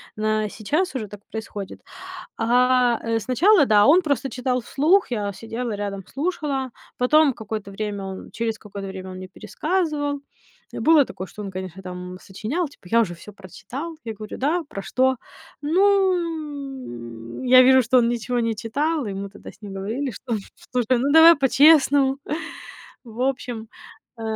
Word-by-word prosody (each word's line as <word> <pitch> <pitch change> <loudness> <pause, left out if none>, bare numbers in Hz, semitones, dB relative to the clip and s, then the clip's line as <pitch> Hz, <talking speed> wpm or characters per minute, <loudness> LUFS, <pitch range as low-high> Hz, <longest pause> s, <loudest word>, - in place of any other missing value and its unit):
на 215 0 0
сейчас 300 - -1
уже 220 -5 -3
так 205 +1 -11
происходит. 215 -3 -7 0.6
А, 245 +1 +3
э, 230 0 0
сначала, 295 - +4
да, 205 -3 +5
он 335 +6 +6
просто 285 -4 -1
читал 250 0 -1
вслух. 310 - +2
Я 205 -4 -2
сидела 225 +3 -5
рядом, 200 -1 -4
слушала. 280 -4 -2 0.3
Потом 295 +3 +4
какое-то 215 -3 -6
время 205 0 -4
он 190 0 -7
через 225 -1 -2
какое-то 200 -1 -8
время 190 -1 -7
он 185 - -8
мне 185 0 -8
пересказывал. 290 - -2 0.5
Э, - - -5
было 315 -3 +6
такое, 185 - -7
что 210 - -9
он, 195 - -5
конечно, 185 0 -7
там 180 0 -7
сочинял, 255 - -3
типа, 230 -9 -17
я 230 - +5
уже 185 -6 -1
всё 175 +5 -12
прочитал. 255 - -8
Я 225 -1 -5
говорю: 215 0 -8
да, 315 +6 +1
про 200 -10 -6
что? 260 +3 +1 0.5
Ну. 295 - -1
Я 255 0 +8
вижу, 260 0 +6
что 250 +2 +3
он 235 -1 +3
ничего 240 +1 -1
не 230 -1 0
читал. 290 +8 -1
И 200 - -3
мы 200 +1 -5
тогда 205 - -11
с - - -25
ним 200 -2 -8
говорили, 225 +8 -3
что, 235 +1 -4 0.4
слушай, 250 0 +2
ну 275 +4 +1
давай 325 +2 +9
по-честному. 280 -1 +5 0.9
В 235 0 -9
общем, 245 -4 -2 0.5
э, - - -7
245 Hz, 165 wpm, -23 LUFS, 205-285 Hz, 0.9 s, давай